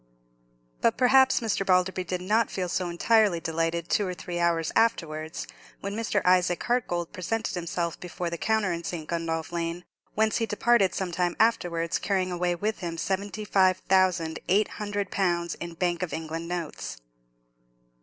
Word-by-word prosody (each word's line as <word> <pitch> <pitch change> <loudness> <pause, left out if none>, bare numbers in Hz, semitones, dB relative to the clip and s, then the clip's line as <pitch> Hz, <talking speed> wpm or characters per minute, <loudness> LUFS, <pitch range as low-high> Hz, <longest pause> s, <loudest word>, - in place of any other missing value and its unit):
But 230 - +2
perhaps 260 +1 +5
Mr. 220 -3 0
Balderby 185 0 +2
did 180 +1 -3
not 215 +4 +2
feel 185 -2 -2
so 175 0 -1
entirely 205 +1 +3
delighted 165 +1 -1
two 205 - +1
or 180 - -3
three 175 +1 -5
hours 170 -2 +1
afterwards, 160 -9 0 0.3
when 200 +1 -4
Mr. 230 0 0
Isaac 180 -1 +3
Hartgold 175 -9 -1
presented 220 +5 -2
himself 170 -1 -3
before 180 -1 -4
the 170 - -3
counter 220 -5 +1
in 170 0 -4
St. 160 -2 -5
Gundolph 165 -1 -2
Lane, 170 +1 -3 0.3
whence 220 0 +2
he 225 - 0
departed 210 -2 +3
some 190 -2 -2
time 175 0 0
afterwards 175 -7 +1
carrying 190 -2 0
away 175 0 0
with 210 +5 -2
him 170 -2 -4
seventy 200 +3 -2
five 185 -2 +4
thousand 185 -4 +2
eight 205 +4 +3
hundred 205 -2 -2
pounds 175 -3 0
in 170 0 -6
Bank 175 0 0
of 180 - -3
England 160 +1 -4
notes. 160 - -5
180 Hz, 165 wpm, -27 LUFS, 170-205 Hz, 0.3 s, perhaps